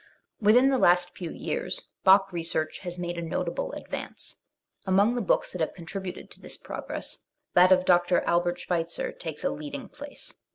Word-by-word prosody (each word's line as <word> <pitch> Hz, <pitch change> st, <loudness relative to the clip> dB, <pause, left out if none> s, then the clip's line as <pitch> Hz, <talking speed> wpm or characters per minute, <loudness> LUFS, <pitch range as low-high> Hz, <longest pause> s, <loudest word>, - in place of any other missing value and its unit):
Within 245 Hz, +6 st, +5 dB
the 265 Hz, -, +2 dB
last 175 Hz, -2 st, +4 dB
few 175 Hz, -3 st, -5 dB
years -, -, -2 dB, 0.2 s
Bach 195 Hz, 0 st, +6 dB
research 165 Hz, -2 st, -1 dB
has 175 Hz, -1 st, -6 dB
made 175 Hz, -1 st, -3 dB
a -, -, -3 dB
notable 165 Hz, -, -2 dB
advance. -, -, -7 dB, 0.5 s
Among 200 Hz, +5 st, +4 dB
the 245 Hz, -, -1 dB
books 200 Hz, -, +1 dB
that 180 Hz, -, -5 dB
have 160 Hz, -, -1 dB
contributed 185 Hz, +1 st, -7 dB
to -, -, -12 dB
this -, -, -7 dB
progress, -, -, -6 dB, 0.3 s
that 180 Hz, +1 st, +6 dB
of 185 Hz, 0 st, +5 dB
Dr, 175 Hz, 0 st, +4 dB
Albert 175 Hz, 0 st, +1 dB
Schweitzer 170 Hz, -1 st, -2 dB
takes 160 Hz, -3 st, -7 dB
a -, -, +1 dB
leading 150 Hz, -1 st, -6 dB
place. 290 Hz, -1 st, -10 dB
180 Hz, 170 wpm, -27 LUFS, 170-195 Hz, 0.5 s, Bach